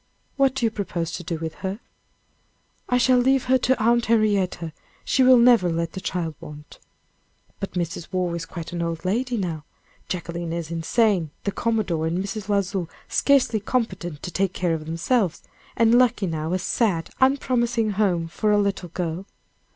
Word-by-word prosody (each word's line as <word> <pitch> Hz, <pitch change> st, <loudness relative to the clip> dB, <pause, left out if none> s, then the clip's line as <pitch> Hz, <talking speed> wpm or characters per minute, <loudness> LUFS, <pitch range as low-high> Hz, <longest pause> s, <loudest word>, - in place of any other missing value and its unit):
"What 270 Hz, -2 st, +2 dB
do 255 Hz, -, 0 dB
you 225 Hz, -, +2 dB
propose 175 Hz, -6 st, -3 dB
to 175 Hz, -, -5 dB
do 165 Hz, 0 st, -3 dB
with 160 Hz, 0 st, -5 dB
her?" 195 Hz, +2 st, -3 dB, 1.1 s
"I 250 Hz, -, +3 dB
shall 250 Hz, 0 st, +4 dB
leave 265 Hz, +1 st, +3 dB
her 260 Hz, 0 st, +3 dB
to 255 Hz, 0 st, +1 dB
Aunt 235 Hz, +2 st, +2 dB
Henrietta 200 Hz, -7 st, +1 dB, 0.3 s
she 265 Hz, -, +2 dB
will 255 Hz, 0 st, +7 dB
never 235 Hz, -6 st, +5 dB
let 165 Hz, 0 st, -1 dB
the 190 Hz, -, -7 dB
child 170 Hz, -4 st, -2 dB
want." 150 Hz, 0 st, -11 dB, 0.8 s
"But 195 Hz, -, -5 dB
Mrs. 170 Hz, -2 st, -4 dB
Waugh 180 Hz, -2 st, -1 dB
is 170 Hz, -1 st, -4 dB
quite 170 Hz, -1 st, -7 dB
an 170 Hz, -, -2 dB
old 165 Hz, 0 st, -3 dB
lady 240 Hz, +6 st, 0 dB
now. 165 Hz, -6 st, -3 dB, 0.5 s
Jacquelina 170 Hz, -1 st, -4 dB
is 170 Hz, -1 st, -5 dB
insane, 175 Hz, +1 st, +1 dB
the 200 Hz, -, -1 dB
commodore 195 Hz, -9 st, 0 dB
and 165 Hz, +2 st, -1 dB
Mrs. 200 Hz, +2 st, -4 dB
L'Oiseau 195 Hz, -3 st, 0 dB, 0.2 s
scarcely 270 Hz, -6 st, +3 dB
competent 200 Hz, -, -2 dB
to 180 Hz, -, -5 dB
take 185 Hz, +2 st, 0 dB
care 175 Hz, -2 st, 0 dB
of 155 Hz, -1 st, -4 dB
themselves 170 Hz, +3 st, 0 dB, 0.3 s
and 230 Hz, 0 st, +4 dB
Luckenough 195 Hz, -11 st, +2 dB
a -, -, +2 dB
sad, 190 Hz, -2 st, 0 dB
unpromising 240 Hz, -4 st, +2 dB
home 190 Hz, -5 st, +1 dB
for 210 Hz, +5 st, -1 dB
a 210 Hz, -, +4 dB
little 200 Hz, -3 st, -1 dB
girl." 175 Hz, +2 st, -4 dB
190 Hz, 170 wpm, -24 LUFS, 170-230 Hz, 1.1 s, will